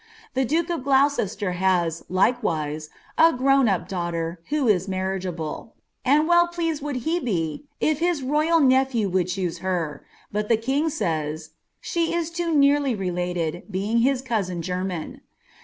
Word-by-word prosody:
Tb> 265 Hz, -1 st, +1 dB
iluke 335 Hz, +3 st, +1 dB
of 325 Hz, -, -4 dB
Gloucester 265 Hz, -8 st, +2 dB
has. 180 Hz, -3 st, +1 dB
likewise, 160 Hz, -7 st, 0 dB, 0.3 s
a 330 Hz, +1 st, +7 dB
grown 270 Hz, 0 st, +3 dB
ap 190 Hz, -4 st, 0 dB
girl, 170 Hz, -2 st, -3 dB
who 295 Hz, -4 st, +1 dB
ia 210 Hz, -4 st, +5 dB
marritgnUh 185 Hz, -1 st, -4 dB, 0.3 s
and 295 Hz, +4 st, +3 dB
well 345 Hz, 0 st, +5 dB
pleaHed 330 Hz, -3 st, -2 dB
would 290 Hz, -1 st, -3 dB
he 335 Hz, +2 st, +1 dB
be 175 Hz, -, -2 dB
if 310 Hz, -1 st, +1 dB
his 340 Hz, -4 st, 0 dB
royal 305 Hz, +5 st, +2 dB
nepliew 260 Hz, -, +3 dB
would 180 Hz, -1 st, +1 dB
ctiocoe 180 Hz, -2 st, -3 dB
tej 175 Hz, -5 st, -2 dB, 0.3 s
bui 210 Hz, +1 st, 0 dB
(he 230 Hz, -, +4 dB
king 270 Hz, +8 st, 0 dB
says 155 Hz, -, -3 dB
' -, -, -52 dB
she 335 Hz, 0 st, -1 dB
is 335 Hz, -1 st, -1 dB
too 340 Hz, 0 st, -2 dB
nearly 285 Hz, -3 st, +3 dB
related, 175 Hz, -3 st, -2 dB
being 205 Hz, +4 st, 0 dB
hid 265 Hz, +3 st, +3 dB
eousin 185 Hz, -8 st, -2 dB
genniB.' 180 Hz, -1 st, -4 dB
215 Hz, 155 wpm, -24 LUFS, 180-285 Hz, 0.3 s, a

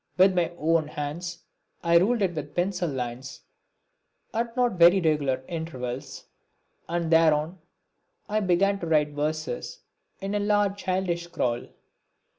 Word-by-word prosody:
With 190 Hz, +1 st, +6 dB
my 175 Hz, -2 st, +1 dB
own 160 Hz, -1 st, +2 dB
hands 150 Hz, +4 st, -5 dB, 0.4 s
I 170 Hz, 0 st, +5 dB
ruled 215 Hz, +4 st, +2 dB
it 180 Hz, -2 st, +1 dB
with 150 Hz, -2 st, -6 dB
pencil 180 Hz, -1 st, 0 dB
lines, 130 Hz, 0 st, -5 dB, 0.9 s
at 230 Hz, +2 st, -2 dB
not 245 Hz, -1 st, +3 dB
very 175 Hz, +3 st, +7 dB
regular 145 Hz, -6 st, +1 dB
intervals, 135 Hz, -5 st, -5 dB, 0.6 s
and 170 Hz, -1 st, -1 dB
thereon 160 Hz, +1 st, +3 dB, 0.7 s
I 215 Hz, 0 st, 0 dB
began 195 Hz, +1 st, +2 dB
to 170 Hz, -, -4 dB
write 150 Hz, -2 st, +3 dB
verses 150 Hz, -2 st, -3 dB, 0.4 s
in 195 Hz, +1 st, -4 dB
a 205 Hz, -, +1 dB
large 205 Hz, -1 st, +2 dB
childish 185 Hz, -3 st, -1 dB
scrawl. 125 Hz, -8 st, -2 dB
170 Hz, 130 wpm, -26 LUFS, 150-190 Hz, 0.9 s, very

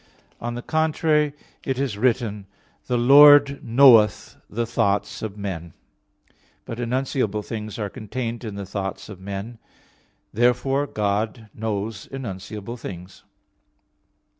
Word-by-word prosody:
On 120 Hz, 0 st, -4 dB
the 120 Hz, -, -6 dB
contrary, 155 Hz, -2 st, +1 dB, 0.3 s
It 135 Hz, -2 st, -2 dB
is 135 Hz, -6 st, -1 dB
written: 110 Hz, -3 st, 0 dB, 0.4 s
"The 125 Hz, -, +1 dB
Lord 140 Hz, +2 st, +7 dB
knoweth 115 Hz, -3 st, +5 dB
the 115 Hz, +3 st, -2 dB
thoughts 105 Hz, -3 st, -1 dB
of 105 Hz, -2 st, -5 dB
men" 85 Hz, -5 st, -5 dB
(Ps. -, -, -41 dB
93:11). -, -, -38 dB, 0.3 s
But 115 Hz, -, -6 dB
enunciable 120 Hz, -3 st, -1 dB
things 110 Hz, -2 st, -6 dB
are 105 Hz, -2 st, -2 dB
contained 120 Hz, +1 st, -5 dB
in 110 Hz, -3 st, -6 dB
the 100 Hz, -1 st, -5 dB
thoughts 95 Hz, +1 st, -5 dB
of 100 Hz, -3 st, -9 dB
men. 100 Hz, +4 st, -7 dB, 0.7 s
Therefore 135 Hz, +4 st, +2 dB
God 105 Hz, 0 st, -2 dB
knows 105 Hz, -1 st, -4 dB
enunciable 110 Hz, -2 st, -6 dB
things. 90 Hz, -3 st, -9 dB
115 Hz, 125 wpm, -23 LUFS, 100-130 Hz, 0.7 s, Lord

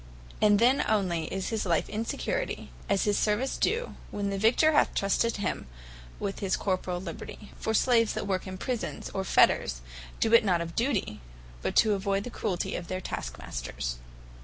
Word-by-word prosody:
And 210 Hz, -1 st, +6 dB
then 245 Hz, +5 st, +4 dB
onely 185 Hz, -7 st, +1 dB
is 190 Hz, -1 st, -2 dB
his 225 Hz, -2 st, -1 dB
life 170 Hz, -3 st, +1 dB
in 215 Hz, +2 st, -3 dB
security, -, -, -3 dB, 0.2 s
and 200 Hz, -, +3 dB
his 205 Hz, 0 st, +2 dB
service 220 Hz, +5 st, +1 dB
due, 475 Hz, +2 st, 0 dB, 0.2 s
when 200 Hz, -1 st, -2 dB
the 195 Hz, -, -2 dB
Victor 245 Hz, +9 st, +4 dB
hath 295 Hz, -, +3 dB
trusted 215 Hz, +4 st, +1 dB
him 200 Hz, -, -2 dB, 0.5 s
with 195 Hz, -1 st, -3 dB
his 195 Hz, -2 st, 0 dB
corporall 185 Hz, -2 st, -1 dB
liberty. 185 Hz, +3 st, -8 dB
For 220 Hz, -, -1 dB
Slaves 230 Hz, -1 st, +4 dB
that -, -, -3 dB
work 190 Hz, -1 st, -1 dB
in 185 Hz, 0 st, -6 dB
Prisons, 245 Hz, +4 st, -4 dB
or 190 Hz, -, -2 dB
Fetters, 65 Hz, -, +3 dB, 0.4 s
do 225 Hz, -, +2 dB
it 230 Hz, -, +8 dB
not 180 Hz, -5 st, +2 dB
of 170 Hz, 0 st, -5 dB
duty, 225 Hz, -, 0 dB, 0.4 s
but -, -, -2 dB
to 215 Hz, -2 st, +5 dB
avoyd 200 Hz, 0 st, 0 dB
the 245 Hz, -, -6 dB
cruelty 180 Hz, -6 st, -2 dB
of 175 Hz, -, -5 dB
their 185 Hz, -, -3 dB
task -, -, -5 dB
masters. -, -, -5 dB
200 Hz, 185 wpm, -28 LUFS, 180-220 Hz, 0.5 s, it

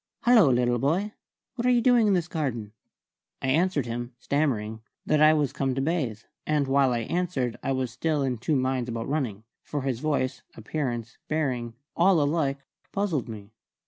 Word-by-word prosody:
"Hallo, 230 Hz, -, +6 dB
little 120 Hz, -1 st, +2 dB
boy! 180 Hz, -, 0 dB, 0.4 s
What 250 Hz, -1 st, -1 dB
are -, -, +5 dB
you 245 Hz, -1 st, +5 dB
doing 235 Hz, -2 st, +4 dB
in 200 Hz, -, +4 dB
this 175 Hz, -2 st, 0 dB
garden?" 120 Hz, -11 st, -3 dB, 0.7 s
I 130 Hz, -, -2 dB
answered 155 Hz, -1 st, +2 dB
him, 120 Hz, +1 st, -5 dB
stammering, 115 Hz, -6 st, -1 dB, 0.2 s
that 155 Hz, -1 st, +2 dB
I 155 Hz, 0 st, +7 dB
was 145 Hz, -3 st, 0 dB
come 135 Hz, -2 st, -1 dB
to 135 Hz, -, 0 dB
bathe; 135 Hz, -8 st, -1 dB, 0.2 s
and 150 Hz, -2 st, +1 dB
while 135 Hz, -1 st, +3 dB
I 120 Hz, -1 st, 0 dB
answered 135 Hz, -4 st, -1 dB
I 135 Hz, -, -1 dB
was 130 Hz, -2 st, -2 dB
still 145 Hz, +3 st, 0 dB
in 125 Hz, -4 st, -1 dB
two 145 Hz, +6 st, 0 dB
minds 130 Hz, -2 st, 0 dB
about 115 Hz, -1 st, -4 dB
running; 125 Hz, -8 st, -2 dB, 0.2 s
for 145 Hz, -3 st, -4 dB
his 130 Hz, -4 st, -1 dB
voice, 135 Hz, -3 st, -1 dB
appearance, 120 Hz, -1 st, -4 dB
bearing, 125 Hz, -7 st, -1 dB, 0.2 s
all 180 Hz, 0 st, +4 dB
alike 145 Hz, -2 st, 0 dB, 0.3 s
puzzled 185 Hz, -, -1 dB
me. 105 Hz, -2 st, -9 dB
135 Hz, 175 wpm, -26 LUFS, 120-155 Hz, 0.7 s, I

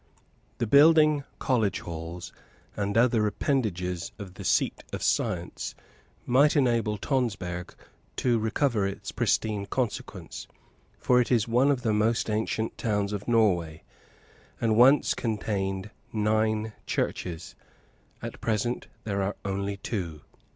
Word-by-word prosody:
The -, -, 0 dB
building 150 Hz, +2 st, +6 dB
college 115 Hz, -6 st, +1 dB
halls, 85 Hz, +1 st, -7 dB, 0.4 s
and 100 Hz, +1 st, -1 dB
other 115 Hz, -2 st, +4 dB
appendages 90 Hz, -, -1 dB
of 100 Hz, -4 st, -8 dB
the -, -, -9 dB
seat -, -, +1 dB
of -, -, -4 dB
science, -, -, -1 dB, 0.5 s
might 140 Hz, +5 st, +4 dB
enable 115 Hz, -6 st, +2 dB
Tonsberg 100 Hz, -9 st, -2 dB, 0.4 s
to 120 Hz, -3 st, +2 dB
recover 110 Hz, -1 st, +1 dB
its 100 Hz, -, -6 dB
pristine 105 Hz, -3 st, 0 dB
consequence, 120 Hz, 0 st, -4 dB, 0.5 s
for 125 Hz, 0 st, +3 dB
it 120 Hz, -, -2 dB
is 115 Hz, -3 st, +3 dB
one 125 Hz, +4 st, +3 dB
of 135 Hz, -3 st, +1 dB
the 110 Hz, -3 st, +1 dB
most 110 Hz, +1 st, +1 dB
ancient 110 Hz, +1 st, -2 dB
towns 105 Hz, -2 st, 0 dB
of 105 Hz, 0 st, -5 dB
Norway, 90 Hz, -9 st, +2 dB, 0.8 s
and 110 Hz, -2 st, +2 dB
once 130 Hz, +5 st, +6 dB
contained 100 Hz, -3 st, -2 dB, 0.2 s
nine 110 Hz, 0 st, +1 dB
churches. 85 Hz, -2 st, -3 dB, 0.7 s
At -, -, -7 dB
present 115 Hz, +2 st, -1 dB, 0.2 s
there 100 Hz, -2 st, -1 dB
are 95 Hz, +1 st, -1 dB
only 100 Hz, +1 st, -2 dB
two. 90 Hz, -7 st, -4 dB
110 Hz, 125 wpm, -27 LUFS, 100-120 Hz, 0.8 s, building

